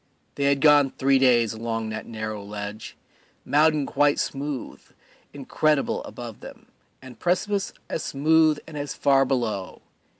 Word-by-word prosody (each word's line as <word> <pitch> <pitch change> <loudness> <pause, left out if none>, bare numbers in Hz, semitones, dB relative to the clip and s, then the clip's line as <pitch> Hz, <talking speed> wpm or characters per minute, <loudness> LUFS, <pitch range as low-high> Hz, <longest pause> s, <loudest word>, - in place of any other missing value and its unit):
They 140 - -2
had 140 -1 +2
gone 145 -2 +6
three 135 0 +3
days 120 -4 +3
along 115 0 -4
that 110 0 -6
narrow 110 -2 -5
ledge: 105 +1 -7 0.5
mountain 150 0 +3
quite 145 +1 +2
smooth, 140 -1 -4 0.5
incredible, 145 +1 0
above 120 -3 -9
them, - - -12 0.4
and 125 -3 -12
precipice 195 +3 0 0.2
as - - -3
smooth 155 +2 +3
and 155 -2 -8
as 145 0 -5
far 135 -1 +3
below. 115 -8 -3
135 Hz, 135 wpm, -24 LUFS, 115-150 Hz, 0.5 s, gone